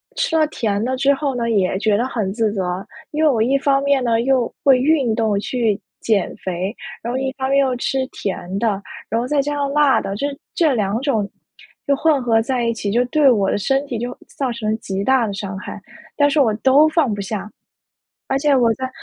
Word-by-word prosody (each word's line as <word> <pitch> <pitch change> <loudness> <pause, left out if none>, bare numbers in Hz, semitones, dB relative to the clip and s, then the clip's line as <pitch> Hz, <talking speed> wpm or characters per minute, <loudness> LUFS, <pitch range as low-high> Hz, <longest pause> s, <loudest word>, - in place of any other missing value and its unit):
吃 325 - 0
了 310 - +3
甜 215 -8 -2
的 260 +2 -1
之 275 +2 +3
后 280 -1 -2
呢， 235 -1 -1
也 190 -3 +1
觉 210 0 +2
得 240 - 0
很 210 -7 -2
自 220 -1 0
责， 185 -1 -3 0.3
因 305 +1 -1
为 310 - +5
我 235 -6 +1
一 260 +4 +2
方 275 0 +1
面 280 -2 +2
呢， 230 -1 +2
又 255 -1 +1
会 270 -4 +5
运 270 -4 +2
动 220 -3 +1
去 220 -2 -1 0.2
减 210 -5 0
肥， 185 +4 -4 0.3
然 235 +2 -3
后 - - -1
一 265 0 -1
方 265 - -1
面 275 - +4
又 265 -2 +2
吃 260 +2 -1
甜 190 -5 -5
的， 205 -3 0 0.3
然 225 - 0
后 245 - -3
再 295 +2 +1
加 290 +1 -2
上 280 -1 -1
辣 290 -2 +3
的， 195 - -4
这 245 - -2 0.3
这 315 -5 +3
2 210 -2 0
种 225 -8 0 0.6
就 280 - +3
混 295 -1 +2
合 225 -2 +3
在 245 0 -1
一 230 - +1
起， 205 -3 -3
就 240 +4 +3
对 280 +2 +4
我 200 -4 +2
的 - - 0
身 270 +7 0
体 245 - -3
就 245 +2 -4 0.2
造 265 -3 -1
成 225 -2 -3
了 - - +1
极 195 -3 -4
大 260 -3 +3
的 200 - -4
伤 195 -1 -5
害， 205 - -8 0.4
但 290 -1 +4
是 295 - +1
我 225 -5 +3
都 270 +7 +5
放 310 -8 +1
不 205 - -4
下。 200 0 -5 0.8
而 270 - +1
且 285 0 +3
我 240 -3 +3
在 260 +2 -4
245 Hz, 245 characters per minute, -20 LUFS, 210-275 Hz, 0.8 s, 为